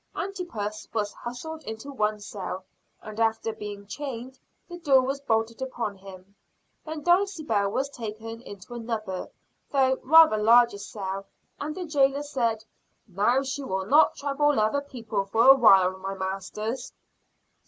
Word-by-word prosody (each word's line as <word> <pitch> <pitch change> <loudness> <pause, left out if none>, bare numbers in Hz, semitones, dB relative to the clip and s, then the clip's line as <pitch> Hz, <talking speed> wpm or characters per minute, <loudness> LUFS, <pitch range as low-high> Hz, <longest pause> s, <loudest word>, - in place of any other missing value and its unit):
Antipas 235 - -4
was 205 -2 -1
hustled 310 +7 -7
into 220 +5 -7
one 215 -5 0
cell, 195 -2 -6 0.4
and, 215 0 -8
after 225 0 +1
being 205 -2 -8
chained, 260 +1 -6 0.3
the 350 -1 -9
door 275 -6 +5
was 270 +2 -2
bolted 225 -2 0
upon 240 -5 -3
him. 190 0 -13 0.5
Then 310 -1 -6
Dulcibel 325 - +2
was 265 +7 -1
taken 225 -3 -7
into 200 0 -11
another, 225 -5 -4 0.4
though 265 -2 +2
rather 320 -5 +7
larger 230 0 +5
cell, 195 -1 -5 0.3
and 300 +1 -4
the 365 -1 -4
jailor 280 -2 +2
said, 235 -6 -1 0.4
"Now 215 +8 +2
she 270 +1 -4
will 190 -8 -3
not 290 +9 +5
trouble 285 -1 +1
other 215 +7 +2
people 230 -7 -4
for 225 +5 +3
a 270 - +11
while, 190 -7 +6
my 195 +1 -4
masters." 195 +6 -4
230 Hz, 145 wpm, -26 LUFS, 205-275 Hz, 0.5 s, a